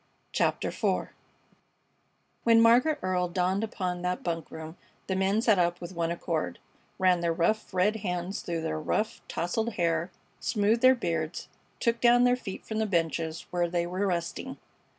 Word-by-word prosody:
CHAPTER - - +1
IV - - -1 1.3
When 230 -1 +6
Margaret 245 +7 +5
Earle 180 -1 +1
dawned 185 +3 0
upon 180 -5 -3
that 180 0 -2
bunk 165 -2 -3
room 160 +1 -8 0.3
the 190 - -1
men 195 +4 +1
sat 215 -6 +4
up 175 0 +1
with 175 +1 -7
one 165 -1 -1
accord, 165 - -2 0.4
ran 185 -1 +3
their 170 -1 0
rough, 175 +6 0
red 195 +4 +2
hands 180 -2 -3
through 170 -2 -3
their 160 -1 -2
rough, 215 +8 -1
tousled 220 +7 -2
hair, 170 -1 0 0.3
smoothed 215 +1 +1
their 260 +1 +7
beards, 165 -7 -3 0.3
took 235 -1 0
down 245 0 +6
their 245 0 +5
feet 195 -6 -7
from 220 0 -3
the 220 - +1
benches 165 -3 -1
where 175 -1 0
they 170 0 0
were 185 +3 -1
resting. 180 +9 -3
180 Hz, 165 wpm, -28 LUFS, 170-220 Hz, 1.3 s, their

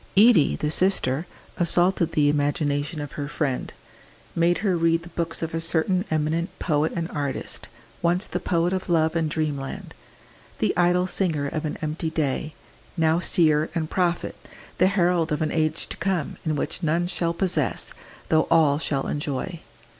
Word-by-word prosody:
Edie, 205 - +6
the 150 - -2
sister, 170 -4 +1 0.3
assaulted 175 0 +2
the 150 -1 +3
imagination 145 +1 0
of 145 - -6
her 145 -1 -4
friend, 145 -3 -2 0.6
made 170 +1 +3
her 190 -3 +3
read 165 0 +2
the 175 - -11
books 165 -1 -3
of 165 - -3
a 165 - -1
certain 175 +3 +1
eminent 155 +3 0
poet 155 -2 +1
and 170 -1 -2
artist, 140 -3 -4 0.3
once 175 +3 +2
the - - -3
poet 175 0 +1
of 185 0 -3
love 160 -1 +2
and 160 -2 +1
dreamland, 150 -4 -3 0.6
"the - - +1
idle 180 +1 +3
singer 170 -6 0
of 155 +2 -3
an 150 - -3
empty 155 +1 -2
day," 155 -1 -2 0.4
now 160 0 +3
seer 155 -3 +2
and 160 -2 -2
prophet, 175 -2 0 0.4
the 185 - +6
herald 175 -4 +2
of 150 +1 0
an 155 - -1
age 155 0 0
to - - -4
come, 185 -6 -1
in 155 -2 0
which 145 - -3
none 165 +1 +1
shall 175 -1 -1
possess, 170 -4 -1 0.4
though 160 0 +3
all 155 -3 +4
shall 140 -4 -1
enjoy. 150 +4 -3
160 Hz, 165 wpm, -24 LUFS, 150-175 Hz, 0.6 s, Edie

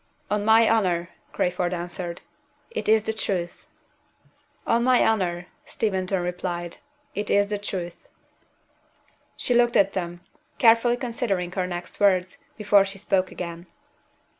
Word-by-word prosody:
"On 210 0 +1
my 220 +1 +5
honor," 180 -6 +1 0.2
Crayford 180 0 -1
answered, 175 0 -6 0.5
"it 470 - -3
is 220 -1 +5
the 220 - -2
truth." 180 -5 -3 1.0
"On 235 +1 +2
my 255 0 +4
honor," 180 -5 0 0.2
Steventon 190 -3 -1
repeated, 175 -1 -4 0.4
"it 205 0 -3
is 200 0 +3
the 205 -1 -2
truth." 180 -4 -6 1.3
She 245 - 0
looked 240 0 +4
at 195 0 +3
them, 175 -2 -4 0.4
carefully 235 +1 +5
considering 230 -8 -2
her 180 0 -2
next 175 -1 -6
words, 185 +4 +2 0.2
before 205 -2 +4
she 195 0 -6
spoke 190 -1 0
again. 170 0 -7
195 Hz, 130 wpm, -25 LUFS, 175-220 Hz, 1.3 s, my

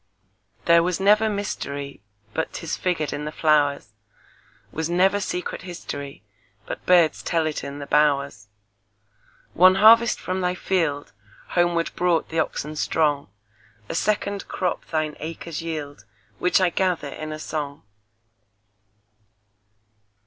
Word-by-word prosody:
There 170 0 +6
was 180 +1 -1
never 210 +3 +4
mysteryBut 140 - -5
'tis 165 - -4
figured 170 -5 -1
in 150 - -4
the 150 - -4
flowers; 145 -6 +2 0.8
SWas 160 +1 -2
never 190 +3 +3
secret 180 -2 -4
historyBut 115 - -9
birds 175 -3 +4
tell 165 -2 0
it 155 -1 -3
in 140 0 -6
the 145 - -6
bowers. 140 -5 +1 1.1
One 185 +2 +6
harvest 225 +3 +6
from 185 +1 -3
thy 180 0 0
fieldHomeward 165 - -1
brought 175 -2 +1
the 165 - -1
oxen 155 -1 -2
strong;A 110 -9 -3
second 200 +2 -1
crop 180 -2 -2
thine 155 -2 -2
acres 165 0 -6
yield, 150 -3 -6 0.3
Which 180 - +3
I 185 -2 +2
gather 180 -6 0
in 155 +2 -6
a 155 - -5
song. 150 -2 -5
155 Hz, 115 wpm, -23 LUFS, 140-180 Hz, 1.1 s, There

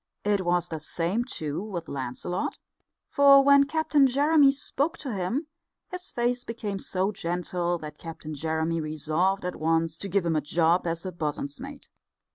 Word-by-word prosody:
It 205 -2 +1
was 175 0 +1
the 160 - -4
same, 175 +9 -1
too, 155 -3 -4
with 185 -6 -5
Lancelot, 135 +6 -3 0.5
for 280 -1 +7
when 280 0 +6
Captain 300 -2 +3
Jeremy 285 +2 +5
spoke 285 +3 -1
to 265 -6 -5
him 205 - -2 0.5
his 365 0 -5
face 245 +1 0
became 215 -4 -4
so 190 +1 -1
gentle 175 -1 -2
that 150 -2 -9
Captain 160 -2 -8
Jeremy 160 +2 -1
resolved 155 +5 0
at 180 - -3
once 165 0 0
to 200 - -5
give 195 -1 +1
him 165 -1 +1
a 155 - +2
job 165 +4 +2
as 165 +2 -3
bosun's 145 -2 -3
mate. 275 +1 -9
180 Hz, 160 wpm, -27 LUFS, 160-245 Hz, 0.5 s, for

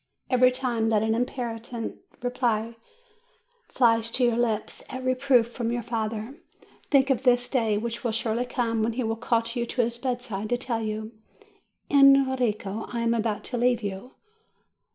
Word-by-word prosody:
Every 255 0 +6
time 250 -3 -1
that 215 -1 +2
an 220 0 +1
impertinent 235 -1 -4 0.3
reply 235 -2 -1 0.9
flies 230 -2 +2
to 250 - 0
your 240 -1 +3
lips 230 -3 -1
at 260 -1 -5
a - - -8
reproof 255 -2 +3
from 235 -1 -2
your 240 0 -2
father, 225 +4 -4 0.5
think 275 -1 +4
of 255 - +1
that 245 -2 +3
day 225 -5 +1
which 230 +3 -4
will 235 - 0
surely 230 +2 -1
come 230 -3 -1
when 225 +1 0
he 250 +2 -2
will 225 0 -1
call 230 0 +1
you 240 -1 -2
to 245 - 0
his 235 +1 -3
bedside 240 -5 -3
to 245 - +1
tell 240 -2 -2
you, 215 0 -4 0.8
"Enrico, 260 -7 +3
I 235 - -2
am 230 0 +2
about 220 -2 -1
to 245 - -4
leave 245 -1 +2
you." 200 +5 -6
235 Hz, 170 wpm, -26 LUFS, 225-250 Hz, 0.9 s, Every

